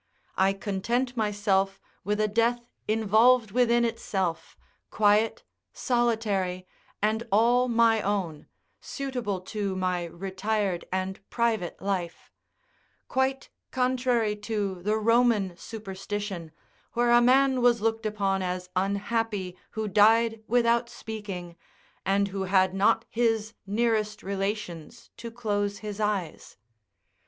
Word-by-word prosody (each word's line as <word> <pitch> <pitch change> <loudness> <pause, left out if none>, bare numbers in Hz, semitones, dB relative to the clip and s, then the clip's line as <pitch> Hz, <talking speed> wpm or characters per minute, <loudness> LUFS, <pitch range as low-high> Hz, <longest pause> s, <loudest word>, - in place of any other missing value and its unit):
I 190 +1 +3
content 230 +6 -2
myself 205 -3 0 0.2
with 210 +1 -1
a 215 - +3
death 235 +3 0 0.2
involved 220 +2 +4
within 240 0 +3
itself, 190 -7 -3 0.3
quiet, 215 - +2 0.3
solitary, 215 -7 0 0.4
and 215 +1 +2
all 240 +4 +4
my 230 -2 +3
own, 185 -8 -2 0.3
suitable 250 -8 -4
to 200 0 -3
my 180 -2 -1
retired 190 +2 -2
and 185 +1 -2
private 225 -7 -1
life; 185 -4 -3 0.8
quite 265 +1 -1 0.2
contrary 250 -4 +1
to 205 -3 -3
the 210 +4 +1
Roman 225 -4 +2
superstition, 195 -4 -6 0.4
where 240 0 +2
a 240 0 +6
man 260 +1 +4
was 240 -1 +4
looked 225 0 0
upon 195 -2 0
as 180 0 -4
unhappy 200 0 -1
who 220 -1 -3
died 225 +3 +4
without 235 0 +2
speaking, 195 -7 -7 0.5
and 200 +1 +2
who 195 0 -3
had 190 0 +3
not 195 +2 +2
his 225 -2 0
nearest 215 0 0
relations 195 -1 -4
to 235 - -7
close 205 -3 -2
his 210 0 -5
eyes. 205 -6 -3
210 Hz, 110 wpm, -27 LUFS, 195-230 Hz, 0.8 s, a